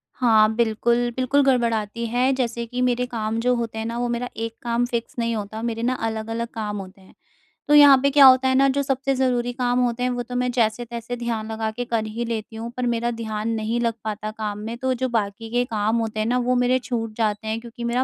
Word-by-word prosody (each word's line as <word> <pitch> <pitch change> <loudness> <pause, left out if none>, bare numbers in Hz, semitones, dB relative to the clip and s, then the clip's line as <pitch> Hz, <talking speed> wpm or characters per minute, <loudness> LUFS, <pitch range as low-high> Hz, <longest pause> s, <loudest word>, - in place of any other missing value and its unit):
हाँ, 220 -3 +4
बिल्कुल। 235 +1 +1
बिल्कुल, 260 +2 +2
गड़बड़ाती 235 -3 +1
है 250 +3 +2
जैसे 235 -2 -2
कि 250 +2 -4
मेरे 250 0 +1
काम 225 -2 -3
जो 250 +2 +2
होते 230 -2 -4
हैं 220 - -3
ना 230 +1 -3
वो 245 - 0
मेरा 240 +1 -2
एक 230 0 -4
काम 240 0 0
फ़िक्स 235 -1 -4
नहीं 230 0 0
होता, 215 +1 -5
मेरे 230 -1 -3
ना 255 +1 +1
अलग-अलग 225 +1 -3
काम 210 -2 -4
होते 195 0 -9
हैं। 190 - -19 0.5
तो 295 - +3
यहाँ 285 -2 +9
पे 280 - +4
क्या 280 -1 +7
होता 260 0 +7
है 260 - +2
ना, 275 +1 +5
जो 280 +1 0
सबसे 270 0 0
ज़रूरी 245 -2 0
काम 245 -1 0
होते 245 0 0
हैं 250 - +1
वो 245 -1 -2
तो 250 +1 -8
मैं 250 0 0
जैसे-तैसे 235 +1 -1
ध्यान 225 -2 -3
लगा 220 0 -2
के 245 +2 -4
कर 225 -2 -1
ही 225 +2 -4
लेती 225 0 -4
हूँ 230 +1 -6
पर 250 - -1
मेरा 235 +1 -1
ध्यान 220 -1 -4
नहीं 220 +2 -1
लग 230 -1 +1
पाता 215 0 -4
काम 210 -1 -3
में 230 +1 -5
तो 260 +1 0
जो 255 +1 -2
बाकी 220 0 -2
के 245 +1 +1
काम 220 -1 0
होते 220 -1 -2
हैं 215 - 0
ना, 250 +1 +1
वो 250 0 +1
मेरे 250 +1 +2
छूट 230 -3 -4
जाते 215 -1 -1
हैं 220 +1 -1
क्योंकि 235 0 -9
मेरा 240 +2 +1
235 Hz, 245 wpm, -23 LUFS, 220-250 Hz, 0.5 s, यहाँ